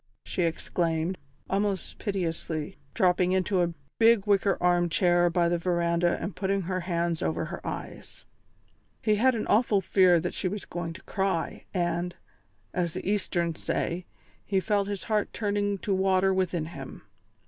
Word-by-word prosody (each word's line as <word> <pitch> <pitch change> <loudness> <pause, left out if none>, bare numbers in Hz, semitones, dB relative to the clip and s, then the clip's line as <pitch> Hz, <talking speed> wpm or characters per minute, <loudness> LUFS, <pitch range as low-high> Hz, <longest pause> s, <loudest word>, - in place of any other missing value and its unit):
she - - -2
exclaimed, 165 +1 0 0.3
almost 195 -1 -1
piteously, 165 -6 -3 0.2
dropping 180 0 +3
into 190 0 +2
a 175 -1 +1 0.3
big 225 -3 +5
wicker 200 -1 +3
armchair 175 0 +3
by 170 0 +2
the 170 0 +1
verandah 170 0 +1
and 175 0 -4
putting 195 0 0
her 185 +1 -2
hands 170 -2 -1
over 80 +1 -1
her - - -6
eyes. - - -7 0.8
He 215 -2 +3
had 255 +3 +4
an 220 - -2
awful 215 -2 +3
fear 185 -3 +4
that 175 - -3
she 190 - -1
was 200 0 -4
going 170 -1 -4
to 170 - -12
cry, 190 -4 -2
and, 175 -1 -1 0.6
as 175 -3 -1
the - - -5
Easterns 175 -5 0
say, 175 +1 -2 0.4
he 195 -2 +1
felt 200 0 +1
his 200 -2 -4
heart 215 -2 0
turning 205 -1 0
to 195 +1 -2
water 190 0 +3
within 180 -4 0
him. 140 -5 -9
180 Hz, 155 wpm, -28 LUFS, 170-200 Hz, 0.8 s, big